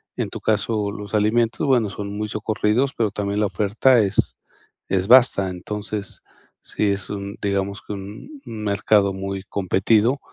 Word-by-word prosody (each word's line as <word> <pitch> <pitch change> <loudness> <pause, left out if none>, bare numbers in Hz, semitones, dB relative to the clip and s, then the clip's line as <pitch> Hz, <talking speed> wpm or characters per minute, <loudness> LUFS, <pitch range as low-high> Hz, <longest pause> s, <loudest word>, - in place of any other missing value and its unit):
En - - -2
tu - - -8
caso, 105 -1 0
los 105 0 -6
alimentos, 115 +2 +1
bueno, 125 -6 +2
son 100 +1 -6
muy 105 +1 -3
socorridos, 110 +4 0
pero 110 -3 0
también 100 0 -2
la 105 - +2
oferta 110 +6 +3
es 100 -2 +1 0.5
es 95 0 0
basta. 120 -6 +6
Entonces, 105 +2 -5 0.4
sí 105 -1 -1
es 100 -1 -3
un, 100 0 -5
digamos 100 0 -1
que 105 - -7
un 105 - -9
un 110 -1 -7
mercado 100 -1 +2
muy 95 0 -4
competido, 105 +6 +2
105 Hz, 155 wpm, -22 LUFS, 100-110 Hz, 0.5 s, basta